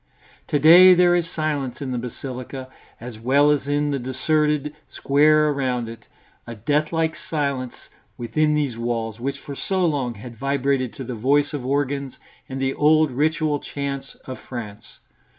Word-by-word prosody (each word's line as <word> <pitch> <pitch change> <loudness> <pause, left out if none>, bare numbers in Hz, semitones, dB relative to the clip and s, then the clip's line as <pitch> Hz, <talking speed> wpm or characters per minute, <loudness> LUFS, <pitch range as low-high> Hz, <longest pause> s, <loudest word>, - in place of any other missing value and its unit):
To - - +1
day 175 +5 +8
there 175 0 +4
is 170 -1 -1
silence 145 -7 -3
in 135 -2 -4
the 125 - -2
basilica, 130 +2 -7 0.3
as 115 -1 -9
well 140 +5 +3
as 145 -2 -1
in 145 0 0
the 140 - -1
deserted 150 +3 0 0.2
square 150 +2 +3
around 130 -4 -1
it; 115 0 -10 0.4
a 120 - -7
deathlike 155 +7 0
silence 140 -5 -2 0.4
within 150 +6 0
these 145 -6 -1
walls, 115 -2 -3
which 140 +3 -3
for 140 0 -9
so 190 +5 -1
long 135 -7 -1
had 115 +3 -10
vibrated 135 -2 0
to 135 - -7
the 125 0 -5
voice 140 +6 +1
of 145 -4 -4
organs 140 0 -2 0.3
and 135 0 -5
the 135 0 0
old 155 0 +3
ritual 150 +2 0
chants 140 -1 -5
of 130 - -7
France. 110 -5 -9
140 Hz, 160 wpm, -22 LUFS, 125-150 Hz, 0.4 s, day